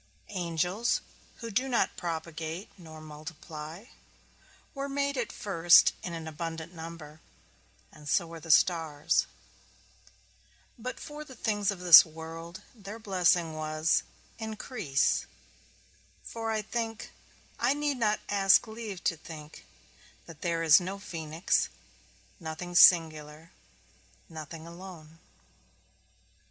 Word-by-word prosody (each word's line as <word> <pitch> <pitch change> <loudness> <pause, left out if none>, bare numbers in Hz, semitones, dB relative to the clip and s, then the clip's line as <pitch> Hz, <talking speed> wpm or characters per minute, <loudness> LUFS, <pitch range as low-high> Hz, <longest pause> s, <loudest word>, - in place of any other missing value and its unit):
Angels, 180 +4 0 0.4
who 230 -1 -5
do 255 +6 0
not 235 -6 +1
propagate 165 +1 -5
nor 160 -4 -12
multiply, 155 +3 -9 0.9
were 275 -1 -4
made 280 0 -1
at 245 -4 -2
first 175 -4 +5
in 175 - -5
an 165 -1 -6
abundant 165 +1 -6
number, 160 -2 -9 0.7
and 150 -2 -11
so 175 - +2
were 165 0 -10
stars; 160 -3 +3 1.5
but 250 +1 -6
for 300 -1 -8
the 265 -3 -13
things 210 -3 0
of 195 -3 -3
this 175 -3 +11
world, 165 +3 -9
their 210 -2 -9
blessing 180 -6 +2
was, 155 +1 +1 0.4
Increase; 215 - -1 1.0
for 225 -1 -5
I 215 -1 -1
think, 225 0 -4 0.5
I 250 +4 +2
need 290 -2 -1
not 215 -3 +1
ask 195 -1 +4
leave 220 -4 -7
to 170 - +1
think, 155 -1 -11 0.6
that 165 -3 -13
there 170 -1 -1
is 160 -2 +8
no 190 +2 -5
phoenix; 165 -3 -1 0.7
nothing 165 +1 -6
singular, 160 -2 +5 0.8
nothing 160 -1 -9
alone. 170 -2 -11
170 Hz, 110 wpm, -29 LUFS, 160-210 Hz, 1.5 s, this